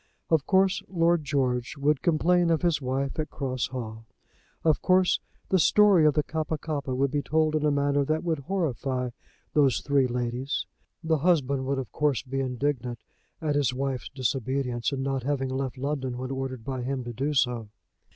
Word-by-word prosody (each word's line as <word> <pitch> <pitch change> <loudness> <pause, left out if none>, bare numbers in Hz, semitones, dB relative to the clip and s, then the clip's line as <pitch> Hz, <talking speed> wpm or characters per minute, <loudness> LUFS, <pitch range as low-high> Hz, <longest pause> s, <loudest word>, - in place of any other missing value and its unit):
Of 160 -4 +3
course 190 0 +3
Lord 170 -2 +2
George 130 -2 -1
would 145 0 +1
complain 175 +1 +3
of 165 +1 +1
his 170 -4 +2
wife 135 +3 -2
at 155 - -2
Cross 130 -3 -2
Hall. 115 -3 -7 0.6
Of 160 -2 +3
course 185 0 +3 0.3
the 190 - +3
story 195 -2 +6
of 150 - +3
the 150 - +2
Kappa 160 0 -2
kappa 145 -4 -3
would 135 +1 +1
be 145 0 0
told 155 +1 +1
in 155 - 0
a 150 - +4
manner 145 0 +2
that 155 +2 0
would 165 -3 0
horrify 135 -7 -2 0.4
those 140 -5 +4
three 140 -2 +2
ladies. 125 +2 -2 0.4
The 160 -1 +1
husband 140 -5 +2
would 140 0 0
of 130 -2 -4
course 150 -6 +1
be 135 0 -3
indignant 125 -2 -2 0.4
at 155 -2 0
his 140 -4 +1
wife's 135 -2 -2
disobedience 130 -1 -1
in 135 -1 -2
not 135 -1 -1
having 135 0 -1
left 130 -1 -3
London 135 -2 -2
when 130 +1 -4
ordered 130 -3 -4
by 130 -2 -3
him 130 +1 -2
to 120 0 -6
do 140 +5 -1
so. 120 -4 +1
140 Hz, 180 wpm, -27 LUFS, 130-155 Hz, 0.6 s, story